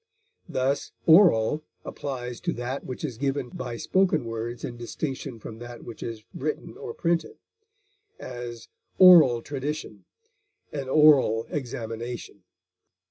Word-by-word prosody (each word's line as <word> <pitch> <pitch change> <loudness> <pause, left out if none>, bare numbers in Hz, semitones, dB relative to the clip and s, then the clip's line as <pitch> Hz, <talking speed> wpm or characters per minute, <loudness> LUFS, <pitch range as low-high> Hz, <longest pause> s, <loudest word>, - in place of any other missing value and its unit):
Thus 130 +2 -1
oral 160 - +6 0.2
applies 125 -4 -5
to - - -1
that 125 +3 -4
which 130 +4 -5
is 125 -6 -6
given 135 -2 -1
by 120 -1 -6
spoken 185 -6 +2
words 115 +1 -5
in 120 - -6
distinction 130 +1 -5
from 110 0 -9
that 120 0 -9
which 115 - -10
is 110 -2 -6
written 150 +2 -4
or 120 - -7
printed; 170 - -1 0.8
as, 120 -2 -7 0.3
oral 160 -11 +8
tradition; 145 +2 -5 0.7
an 140 -3 -4
oral 135 -7 +5
examination. 120 -4 -5
125 Hz, 120 wpm, -26 LUFS, 115-145 Hz, 0.8 s, oral